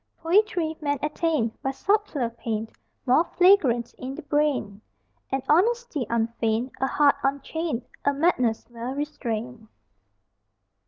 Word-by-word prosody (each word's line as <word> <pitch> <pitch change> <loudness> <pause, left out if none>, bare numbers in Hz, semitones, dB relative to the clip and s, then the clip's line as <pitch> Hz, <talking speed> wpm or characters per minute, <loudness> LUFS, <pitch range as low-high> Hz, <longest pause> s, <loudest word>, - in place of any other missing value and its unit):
Poetry, 345 -2 +1
men 290 -1 0
attain 300 -5 0
By 270 - -1
subtler 295 - 0
pain 225 -1 -4 0.4
More 265 +5 +5
flagrant 285 -11 +4
in 260 +1 -5
the 320 - -8
brain 280 -8 0 0.5
An 270 -1 -1
honesty 365 - +2
unfeigned, 230 +1 0
A 265 - +2
heart 285 0 +3
unchained, 280 0 -2 0.2
A 285 - +3
madness 275 -7 +1
well 240 +3 -5
restrained. 245 -5 -4
275 Hz, 115 wpm, -25 LUFS, 235-320 Hz, 0.5 s, More